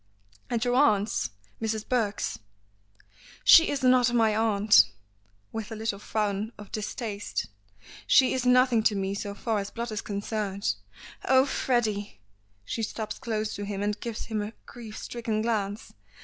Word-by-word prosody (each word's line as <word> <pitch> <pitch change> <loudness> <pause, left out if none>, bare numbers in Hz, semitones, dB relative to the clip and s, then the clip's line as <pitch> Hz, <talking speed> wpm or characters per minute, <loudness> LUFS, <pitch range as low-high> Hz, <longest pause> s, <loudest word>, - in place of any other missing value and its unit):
"At 235 0 0
your 245 - +1
aunt's? 215 -6 +2 0.3
Mrs. 220 -1 -2
Burke's?" 220 -5 -1 1.0
"She 330 0 +8
is 280 -2 -2
not 250 -1 +5
my 220 -2 +3
aunt," 215 -1 +5 0.7
with 225 0 -5
a - - -4
little 220 -2 -3
frown 210 +1 -2
of 205 -1 -11
distaste; 215 -1 -4 0.6
"she 260 - +5
is 255 - -1
nothing 250 -2 +4
to 215 -1 +2
me 195 0 -1
so 200 0 -5
far 220 0 -1
as 200 0 -4
blood 235 0 -5
is 215 - -3
concerned. 200 -1 -2 0.5
Oh! 260 0 +5
Freddy." 215 - -1 0.5
She 225 - -3
stops 215 -1 -4
close 215 -2 -2
to 205 - -5
him, 200 0 -3
and 210 0 -1
gives 230 -2 -5
him 220 -2 -2
a 210 +2 -5
grief 225 -3 -10
stricken 225 -2 -3
glance. 210 -2 -2
220 Hz, 150 wpm, -27 LUFS, 205-235 Hz, 1.0 s, She